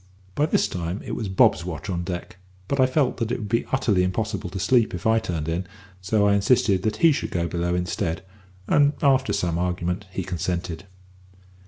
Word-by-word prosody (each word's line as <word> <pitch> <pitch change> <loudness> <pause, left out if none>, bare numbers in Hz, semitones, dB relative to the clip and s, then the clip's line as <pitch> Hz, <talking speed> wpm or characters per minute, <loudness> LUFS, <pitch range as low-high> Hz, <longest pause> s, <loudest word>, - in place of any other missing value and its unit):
By 150 +7 +1
this - - +2
time 85 +2 -4
it - - -5
was 110 -4 -3
Bob's 95 -2 +4
watch 85 -1 -6
on 90 -3 -2
deck; 90 0 -6 0.3
but 140 - -1
I 130 - +5
felt 130 0 +1
that 115 -2 -2
it - - 0
would 105 -3 -6
be 115 +2 0
utterly 115 -8 +2
impossible 95 +1 -2
to 95 - -6
sleep 110 +2 +2
if 90 - -8
I 110 0 +4
turned 85 -8 -4
in, 85 +3 -2 0.3
so 100 +3 +2
I 100 - +4
insisted 100 -1 +3
that 110 +2 -1
he 165 - +8
should 140 - -2
go 85 -1 -1
below 85 +1 -1
instead, 90 -1 -2 0.4
and, 145 0 +4
after 135 -6 +3
some 90 -4 0
argument, 90 +2 -2
he 95 - -3
consented. 85 -1 -3
95 Hz, 200 wpm, -24 LUFS, 90-115 Hz, 0.4 s, he